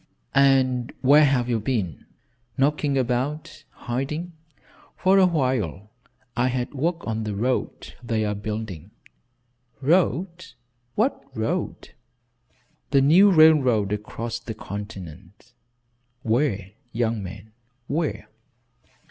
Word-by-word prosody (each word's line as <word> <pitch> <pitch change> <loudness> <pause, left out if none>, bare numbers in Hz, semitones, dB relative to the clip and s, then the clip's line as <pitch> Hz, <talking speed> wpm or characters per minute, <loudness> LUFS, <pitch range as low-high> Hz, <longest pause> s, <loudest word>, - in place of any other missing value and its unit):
"And 130 -3 +3
where 145 +3 +6
have 130 -3 +1
you 120 -2 0
been?" 105 - -3 0.5
"Knocking 145 0 +1
about 130 +4 -2
hiding. 150 +8 -4 0.6
For 195 +1 +4
a 185 - +6
while 120 - -1 0.4
I 120 +1 +2
had 125 0 -2
work 165 +5 -2
on 110 0 -2
the 105 -1 -3
road 125 +5 -2
they 115 -3 -1
are 105 - -1
building 105 -5 -5 0.5
" 125 0 -43
"Road? 180 -1 0 0.4
What 225 - 0
road?" 155 +11 -3 1.0
"The 140 -1 +4
new 175 +9 +6
railroad 135 - +5
across 115 +2 -5
the 115 -1 -7
continent." 100 +1 -9 0.7
"Where, 110 -5 0 0.2
young 115 -2 -1
man, 100 +3 -9 0.3
where?" 155 +4 -2
125 Hz, 105 wpm, -24 LUFS, 110-145 Hz, 1.0 s, where